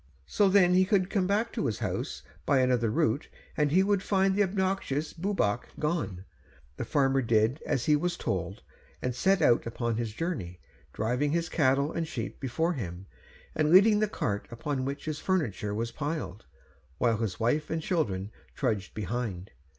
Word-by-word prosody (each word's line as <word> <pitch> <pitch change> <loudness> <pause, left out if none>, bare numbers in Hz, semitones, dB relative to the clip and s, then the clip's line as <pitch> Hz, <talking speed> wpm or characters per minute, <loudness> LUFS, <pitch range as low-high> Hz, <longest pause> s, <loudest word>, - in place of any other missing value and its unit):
So 200 - +3
then 185 -2 +5
he 185 +1 +5
could 185 -1 +1
come 190 -4 +1
back 215 +4 0
to - - -1
his 110 - -2
house - - -3 0.2
by 140 - +2
another 125 -3 +2
route, 110 +5 +1 0.3
and 150 -2 +2
he 185 +4 +5
would 200 -1 +2
find 195 -1 +2
the 205 - +2
obnoxious 190 -6 -1
Bwbach 165 - 0
gone. 110 - -2 0.5
The - - -3
farmer 135 -2 +2
did 115 +3 +2
as 125 - 0
he 150 - +5
was 175 +4 -1
told, 95 +1 -3 0.4
and 125 - -2
set 190 +9 +2
out 120 -1 +4
upon 115 -1 -2
his 115 -2 -2
journey, 110 - -4 0.3
driving 125 +7 0
his 170 0 0
cattle 140 -1 +2
and 165 -1 -2
sheep - - -5
before 160 +7 0
him, 90 - -6 0.5
and 155 -1 +1
leading 205 +5 +7
the 215 - +2
cart 105 - -2
upon 130 +2 -3
which 140 +1 -4
his 155 -1 -3
furniture 120 - -1
was 115 +2 -2
piled, 145 - -4 0.5
while 115 +5 +2
his 105 -5 -3
wife 150 +7 +1
and 160 -1 -2
children 105 - -1 0.2
trudged 110 -7 -2
behind. 105 -3 -4
140 Hz, 175 wpm, -29 LUFS, 115-180 Hz, 0.5 s, leading